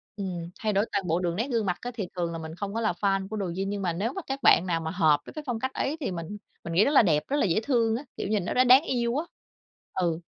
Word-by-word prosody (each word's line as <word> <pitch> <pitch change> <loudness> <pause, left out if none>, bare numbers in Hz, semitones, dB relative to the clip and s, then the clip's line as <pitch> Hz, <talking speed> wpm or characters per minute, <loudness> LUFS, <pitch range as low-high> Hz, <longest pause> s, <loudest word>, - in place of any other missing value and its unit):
Ừm, 180 -4 -4
thay 215 -1 0
đổi 200 +3 +2
toàn 195 -3 -1
bộ 165 +2 +1
đường 175 -2 -1
nét 230 +6 -1
gương 230 -3 +1
mặt 180 -2 0
á 245 - -4
thì 210 -6 -4
thường 170 -2 -1
là 165 - -4
mình 160 0 -7
không 200 +2 -5
có 230 - -1
là 220 - +2
fan 195 -1 +1
của 215 +2 -5
Douyin, 190 +1 -2
nhưng 200 0 -3
mà 175 -3 0
nếu 205 +8 -2
mà 380 - -4
các 270 +1 -3
bạn 175 - +6
nào 170 -3 0
mà 160 0 -3
hợp 160 -4 +3
với - - -10
cái 305 - -6
phong 240 -3 -2
cách 260 +2 -3
ấy 295 +4 -1
thì 270 - -2
mình 170 +3 -5 0.3
mình 170 - -5
nghĩ 185 +5 +5
rất 280 - +2
là 290 - +7
đẹp, 155 -8 +2
rất 285 - 0
là - - +2
dễ 175 +1 +2
thương 230 -3 +2
á, 255 - -4
kiểu, - - -3
nhìn 205 -3 0
nó - - -2
đã 255 - +5
đáng 255 +3 +7
yêu 240 -2 0
á. 315 - -1 0.7
Ừ. 170 -3 0
200 Hz, 315 wpm, -27 LUFS, 175-235 Hz, 0.7 s, là